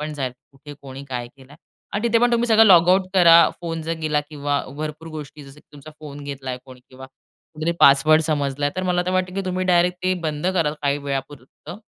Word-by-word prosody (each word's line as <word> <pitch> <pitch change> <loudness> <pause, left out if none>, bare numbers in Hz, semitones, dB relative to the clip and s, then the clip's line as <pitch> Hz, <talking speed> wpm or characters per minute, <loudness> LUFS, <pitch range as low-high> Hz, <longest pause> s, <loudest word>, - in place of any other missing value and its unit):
पण 150 0 -5
जाईल, 130 -4 -4 0.2
कुठे 145 +2 -13
कोणी 135 0 -10
काय 120 -2 -5
केलं 135 +1 -18
आहे 150 - -17 0.3
आणि 215 +4 -1
तिथे 230 - +3
पण 240 0 +2
तुम्ही 235 0 +1
सगळं 220 0 +6
लॉगआउट 185 0 +5
करा. 170 -2 +7
फोन 165 -2 -5
जर 165 +1 -3
गेला 150 -1 0
किंवा 145 -1 -2 0.2
भरपूर 155 +2 -6
गोष्टी, 150 -2 -9
जसं 140 +2 -15
की - - -37
तुमचा 145 +1 -13
फोन 145 -1 -10
घेतलाय 135 -3 -6
कोणी 130 -2 -15
किंवा 130 0 -12
कुठतरी 155 +4 -7
पासवर्ड 155 +3 +5
समजला 145 -2 -1
आहे, 145 - -3
तर 185 - -2
मला 175 0 +1
तर - - 0
वाटतं 185 0 -1
की 195 - -2
तुम्ही 185 0 -2
डायरेक्ट 180 0 +1
ते 185 - +2
बंद 150 +3 -4
कराल 165 -5 0
काही 140 0 0
वेळापुरतं 140 +4 -7
150 Hz, 215 wpm, -21 LUFS, 140-175 Hz, 0.3 s, करा